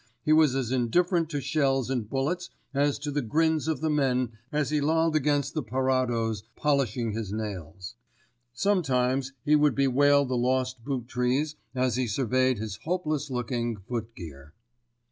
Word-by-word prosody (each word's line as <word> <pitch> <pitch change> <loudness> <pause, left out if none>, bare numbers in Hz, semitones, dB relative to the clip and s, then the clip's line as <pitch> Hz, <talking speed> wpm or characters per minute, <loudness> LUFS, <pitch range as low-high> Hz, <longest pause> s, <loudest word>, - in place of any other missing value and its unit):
He 155 - +4
was 155 -4 +5
as 130 -3 -1
indifferent 165 - +1
to 145 -3 -2
shells 135 -2 0
and 120 -5 -2
bullets 160 +8 -2 0.2
as 145 0 +1
to 145 +1 -4
the 145 +1 0
grins 160 +5 +1
of 160 -2 -1
the 160 - 0
men 130 -4 +1 0.2
as 150 -1 0
he 150 -1 +1
lolled 160 +2 +2
against 145 -1 +1
the 155 - -1
parados 120 -3 0
polishing 130 -6 0
his 105 -2 -4
nails. 95 -2 -6 0.6
Sometimes 135 -5 +1
he 150 - +5
would 150 -2 +3
bewail 140 +1 +4
the 130 -1 -2
lost 130 0 0
boot 130 -3 -3
trees 130 +5 0 0.2
as 125 -2 +1
he 130 -1 0
surveyed 130 +2 +1
his 105 -2 -5
hopeless 155 - -2
looking 120 -2 -2
foot 115 +3 -5
gear. 75 -3 -11
130 Hz, 160 wpm, -27 LUFS, 120-150 Hz, 0.6 s, was